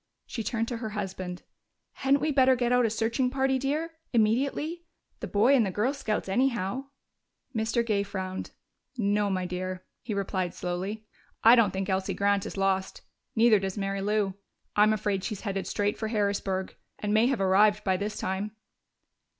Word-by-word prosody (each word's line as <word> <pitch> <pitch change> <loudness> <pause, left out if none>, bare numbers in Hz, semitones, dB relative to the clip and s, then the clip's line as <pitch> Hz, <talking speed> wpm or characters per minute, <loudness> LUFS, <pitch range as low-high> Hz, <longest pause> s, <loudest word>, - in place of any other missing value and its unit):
She 230 - -5
turned 225 +2 -1
to 240 - -3
her 225 -1 -4
husband. 185 -2 -5 0.5
"Hadn't 275 +1 +1
we 305 +1 +1
better 260 -2 +5
get 245 -1 0
out 250 -1 +4
a - - -1
searching 225 +4 0
party, 265 0 +1
dear, 305 +5 -1 0.2
immediately? 275 +9 +1 0.4
The - - -4
Boy 220 +7 +4
and 245 - +4
the 200 - 0
Girl 215 +8 0
Scouts, 220 -9 -2
anyhow." 245 +2 0 0.7
Mr. 225 +1 +1
Gay 210 -3 +1
frowned. 190 -2 -4 0.5
"No, 205 -2 +1
my 185 -1 -1
dear," 185 +1 -4 0.2
he 220 -4 -4
replied 190 -3 -2
slowly. 190 +5 -4 0.4
"I 230 +2 +9
don't 230 -4 +5
think 190 0 -3
Elsie 190 0 -1
Grant 200 0 +1
is - - -7
lost. 190 -1 0 0.3
Neither 225 -2 +5
does 190 +1 -4
Mary 195 -1 -2
Lou. 205 -1 +1 0.4
I'm 210 +1 +5
afraid 205 -2 0
she's 210 -3 -4
headed 195 -3 -3
straight 205 +1 -1
for 220 - -1
Harrisburg 200 -3 -1 0.2
and 210 0 -2
may 220 +3 +5
have 265 -4 0
arrived 205 +2 +4
by 190 -1 +2
this 205 +3 -3
time." 195 +3 -3
210 Hz, 175 wpm, -28 LUFS, 195-235 Hz, 0.7 s, I